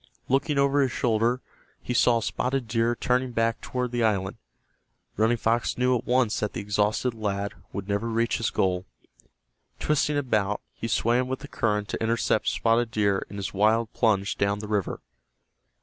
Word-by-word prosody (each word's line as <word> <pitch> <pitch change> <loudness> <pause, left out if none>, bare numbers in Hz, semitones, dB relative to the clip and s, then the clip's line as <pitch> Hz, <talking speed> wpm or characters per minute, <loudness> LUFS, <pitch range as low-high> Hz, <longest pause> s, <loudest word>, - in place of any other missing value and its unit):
Looking 140 +3 +1
over 140 +1 +3
his 130 -2 +1
shoulder, 115 +2 +1 0.4
he 125 - -4
saw 120 -1 +4
Spotted 125 +2 -1
Deer 115 +1 +1
turning 125 +1 0
back 115 0 0
toward 125 -1 -3
the 120 -1 0
island. 100 -4 0 0.8
Running 110 +3 +2
Fox 115 +1 0
knew 125 0 +3
at 120 - -4
once 125 -3 +2
that 105 - -2
the - - -4
exhausted 105 +4 0
lad 100 -2 -3 0.2
would 100 -1 -5
never 100 +3 -1
reach 115 +1 +1
his 115 - 0
goal. 90 -1 0 0.9
Twisting 150 0 +1
about 110 -7 0
he 115 - -5
swam 120 +3 +1
with 130 0 -4
the - - -8
current 105 -2 -1
to - - -4
intercept 110 -1 +1
Spotted 115 +1 +2
Deer 100 -3 0
in 100 - -8
his 100 -1 -4
wild 110 +3 +2
plunge 105 -4 +1
down 100 0 +1
the 105 +1 -6
river. 105 -3 -2
115 Hz, 170 wpm, -26 LUFS, 105-125 Hz, 0.9 s, saw